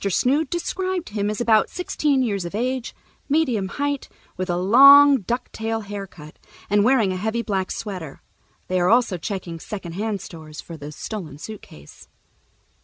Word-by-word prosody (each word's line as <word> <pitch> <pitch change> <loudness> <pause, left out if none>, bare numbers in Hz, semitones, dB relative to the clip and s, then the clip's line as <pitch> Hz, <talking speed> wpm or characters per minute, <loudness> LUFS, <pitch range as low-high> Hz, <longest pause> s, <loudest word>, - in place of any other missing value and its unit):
Snood 270 - +1
described 365 +1 -2
him 205 -1 -1
as 210 - -3
about 225 -2 +3
sixteen 295 -6 0
years 200 -6 -1
of 175 +3 -6
age, 250 +2 -2 0.3
medium 260 -10 +1
height, 285 +7 -3 0.3
with 185 0 -4
a 175 - 0
long 275 +9 +8
'ducktail' 225 +1 -3
haircut, 195 -7 -9 0.3
and 205 0 +4
wearing 225 -5 +3
a 185 - -3
heavy 220 +4 -2
black 190 -4 -2
sweater. 185 -9 -6 0.5
They 185 0 0
are 175 0 +2
also 230 -4 +3
checking 175 -2 -5
second 190 -2 -7
hand 205 +2 -2
stores 160 -4 -10
for 170 - -8
the 150 -1 -8
stolen 160 -2 -7
suitcase." 150 - -11
210 Hz, 155 wpm, -23 LUFS, 185-255 Hz, 0.5 s, long